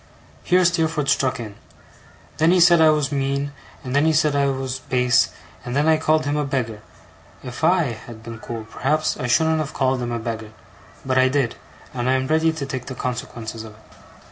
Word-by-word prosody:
Here 180 0 +3
Steerforth 160 -4 +1
struck 130 -2 +1
in. 110 -3 -7 0.8
'Then 160 +1 +3
he 180 +1 +4
said 170 -1 +6
I 160 - +7
was 150 -2 +1
mean, 140 0 -1 0.3
and 130 +1 -4
then 145 - +4
he 160 - +3
said 150 -1 +2
I 140 0 +2
was 130 -1 -3
base, 125 -1 +2 0.3
and 125 +1 -5
then 145 +2 +2
I 160 -1 +5
called 155 0 +1
him 145 +1 0
a 150 - +1
beggar. 125 -6 -3 0.6
If 125 -1 -8
I 160 -11 +2
had 115 -2 -11
been 115 -1 -8
cool, 115 -1 -6
perhaps 135 +7 -1
I 125 - -3
shouldn't 160 +5 +2
have 155 -2 -4
called 130 -1 +1
him 120 0 -3
a 120 - -1
beggar. 110 -1 -5 0.5
But 130 0 +2
I 130 - +5
did, 135 -3 0 0.4
and 125 0 -1
I - - +4
am 130 0 0
ready 160 +3 +2
to 160 -3 -5
take 130 -2 -5
the 130 - -6
consequences 120 -3 -5
of 110 -1 -11
it. 110 - -21
135 Hz, 210 wpm, -22 LUFS, 120-155 Hz, 0.8 s, I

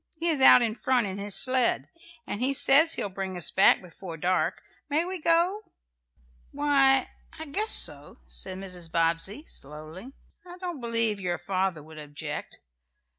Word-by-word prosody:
He 335 +2 -1
is 300 -5 0
out 250 - +8
in 225 -2 0
front 245 0 0
in 195 0 -5
his 200 -1 -1
sled, 255 -2 +2 0.4
and 205 - -5
he 270 +2 +1
says 320 +5 +4
he'll - - -3
bring 190 -1 -6
us 175 - +1
back 190 - +4
before 175 -1 -10
dark. 180 +3 -1 0.3
May 305 +4 +1
we 370 -1 -6
go?" 340 +6 +2 0.9
"Why, 275 -2 +2 0.3
I 315 - -7
guess 420 +10 -2
so," - - +2
said 185 -1 -5
Mrs. 180 -3 -6
Bobbsey, 165 - 0
slowly. 155 - -10 0.3
"I 355 0 -12
don't 350 -6 -6
believe 230 -3 0
your 175 -2 -2
father 185 -3 -2
would 155 0 -13
object. 150 0 -7
215 Hz, 160 wpm, -26 LUFS, 180-285 Hz, 0.9 s, out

